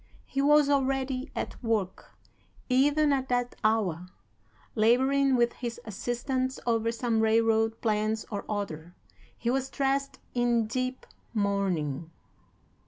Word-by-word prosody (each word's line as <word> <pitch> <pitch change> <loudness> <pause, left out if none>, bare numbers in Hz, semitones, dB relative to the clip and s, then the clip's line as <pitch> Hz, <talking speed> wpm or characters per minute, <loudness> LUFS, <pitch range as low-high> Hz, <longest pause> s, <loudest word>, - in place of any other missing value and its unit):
He 275 - -2
was 295 0 +5
already 270 -1 0
at - - -5
work, 215 -5 -2 0.5
even 290 +3 +3
at 265 -1 -1
that 245 0 0
hour, 195 -6 +1 0.7
laboring 265 +5 +3
with 240 -1 +2
his 235 -2 -5
assistants 255 +5 -2
over 230 -1 +1
some 230 -1 0
railroad 225 0 +2
plans 215 -1 0
or 200 -1 -3
other. 180 -5 -4 0.4
He 235 - -1
was 265 0 -1
dressed 275 0 -1 0.2
in 240 -2 +2
deep 255 +3 -3 0.3
mourning. 185 -8 -1
235 Hz, 115 wpm, -28 LUFS, 215-265 Hz, 0.7 s, was